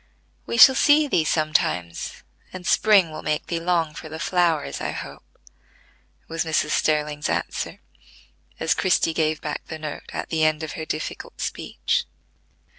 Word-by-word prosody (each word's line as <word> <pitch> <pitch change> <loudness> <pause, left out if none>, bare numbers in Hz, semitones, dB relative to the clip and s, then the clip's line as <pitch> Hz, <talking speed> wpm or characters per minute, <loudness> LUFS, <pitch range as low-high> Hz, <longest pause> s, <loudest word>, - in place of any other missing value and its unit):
We 235 - -2
shall 265 +2 +10
see 295 +2 +4
thee 170 - +2
sometimes, 155 - -1 0.3
and 185 -1 -9
spring 200 -6 +4
will 155 - -7
make 150 0 -1
thee 170 - -2
long 165 -2 0
for 155 - -9
the 160 - -6
flowers, 165 - 0
I - - -2
hope," - - -9 0.9
was 165 0 -2
Mrs. 155 -2 0
Sterling's 150 -1 0
answer, - - -3 0.8
as 165 - +2
Christie 175 -3 +2
gave 155 -1 0
back 150 -1 -4
the 160 - -6
note 155 -1 -7
at - - -5
the 160 -1 0
end 155 0 +2
of 155 - -4
her 160 - -6
difficult 155 0 -5
speech. - - -2
160 Hz, 155 wpm, -23 LUFS, 155-175 Hz, 0.9 s, shall